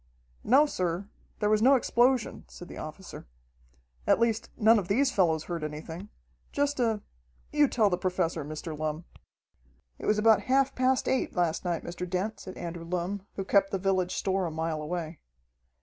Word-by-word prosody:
"No, 275 +6 +5
sir, 180 - -2 0.3
there 210 - +1
was 215 0 +3
no 265 +4 +6
explosion," 245 -1 +1
said 175 - -11
the - - -9
officer. 160 - -9 0.8
"At - - +4
least, 230 -1 +1
none 225 0 +5
of 185 - -5
these 260 +7 +2
fellows 165 -8 +2
heard 170 -3 -4
anything. 160 +5 -6 0.4
Just 285 -1 0
a 225 -4 +1 0.5
you 295 -1 +4
tell 220 -6 +2
the 180 - 0
Professor, 180 -4 -1
Mr. 155 +2 -6
Lumm." 155 +2 -3 0.9
"It - - -5
was 210 - +3
about 215 -1 +5
half 270 +1 +3
past 255 0 +1
eight 265 - 0
last 175 -3 0
night, 175 -3 -2
Mr. 175 +1 -5
Dent," 190 +5 -2
said 185 - -9
Andrew 170 -1 -6
Lumm, 180 +3 -3
who 195 - -3
kept 195 0 +3
the 195 - -1
village 185 -1 0
store 190 -2 0
a - - -3
mile 160 0 -2
away. 160 0 -4
190 Hz, 175 wpm, -28 LUFS, 170-225 Hz, 0.9 s, no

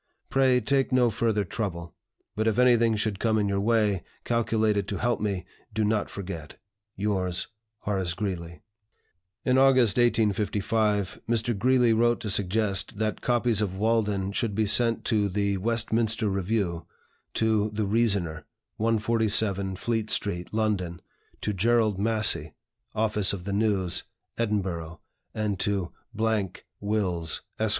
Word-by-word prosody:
Pray 130 -2 +4
take 135 +3 +1
no 125 -2 +3
further 110 -2 0
trouble; 85 -4 -4 0.4
but 110 +1 0
if 110 - +1
anything 120 -3 +4
should 105 -2 -2
come 110 -1 +1
in 105 -1 +1
your 100 0 0
way, 105 -3 +2 0.2
calculated 110 -3 +1
to 100 - -3
help 120 0 0
me, 100 -3 -2 0.3
do 110 - +1
not 105 0 0
forget. 85 -6 -7 0.4
"Yours, 95 -3 -1 0.3
"HORACE 95 -4 -1
GREELEY." 85 -5 -5 0.8
In 130 0 +3
August, 130 -6 +4
1855, 105 -3 +1
Mr. 115 0 0
Greeley 125 +2 +3
wrote 120 +1 +2
to 105 - -2
suggest 100 0 -1
that 110 0 -2
copies 120 -3 +1
of 95 -3 -2
"Walden" 105 -3 +1
should 105 0 -1
be 110 +1 +2
sent 115 +2 +3
to 105 -3 +1
the 100 +1 0
"Westminster 115 +1 0
Review," 95 -3 -1 0.5
to 110 -1 +2
"The 105 0 -2
Reasoner," 100 -8 0 0.3
147 110 -3 +1
Fleet 110 +2 -2
Street, 90 -4 -1
London, 100 -6 -1 0.4
to 105 - -1
Gerald 110 0 +2
Massey, 110 +1 +1 0.4
office 105 -3 +2
of 95 -3 -5
the 100 +1 -3
"News," 100 -4 +1 0.3
Edinburgh, 95 -8 -2 0.4
and 105 -3 -1
to 100 -4 -1
" 110 -4 -3
Wills, 95 -6 -1 0.2
Esq. 110 0 +1
105 Hz, 135 wpm, -26 LUFS, 95-115 Hz, 0.8 s, Pray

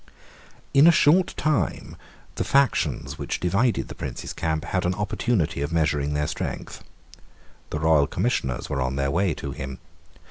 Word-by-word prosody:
In 140 +3 +7
a - - +9
short 170 +3 +4
time 155 -2 -1 0.4
the - - -2
factions 90 - +1
which - - -3
divided 100 +8 +1
the - - -8
Prince's - - -6
camp 80 -1 -2
had 90 - -1
an 90 +1 0
opportunity 105 - -1
of 70 +2 -2
measuring 75 -3 0
their 75 0 0
strength. - - -5 0.9
The 75 - -3
royal 80 -3 +4
Commissioners 80 - -1
were 70 - -2
on 65 +1 -1
their 70 0 0
way 90 0 +1
to 70 - -6
him. 65 0 -6
80 Hz, 155 wpm, -24 LUFS, 70-110 Hz, 0.9 s, a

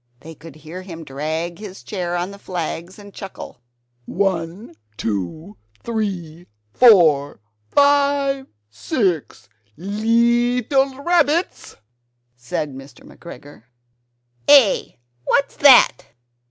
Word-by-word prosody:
They 160 +1 -11
could 160 -1 -14
hear 160 +4 -10
him 170 -3 -10
drag 160 +4 -4
his 200 -3 -10
chair 175 -4 -4
on 175 +2 -3
the 200 - -12
flags, 175 0 -6
and 205 -1 -14
chuckle 195 -9 -10 0.5
"One, 185 +1 -3 0.2
two, 115 - -5 0.3
three, 185 -7 -4 0.3
four, 160 - +5 0.3
five, 280 -1 +2 0.2
six 180 - -2 0.3
leetle 240 - +1
rabbits!" 340 0 0 0.6
said 125 +4 -5
Mr. 135 -1 -13
McGregor. 145 -8 -13 0.8
"Eh? 275 -8 +5 0.3
What's 280 - 0
that? 265 - +6
190 Hz, 95 wpm, -20 LUFS, 160-240 Hz, 0.8 s, that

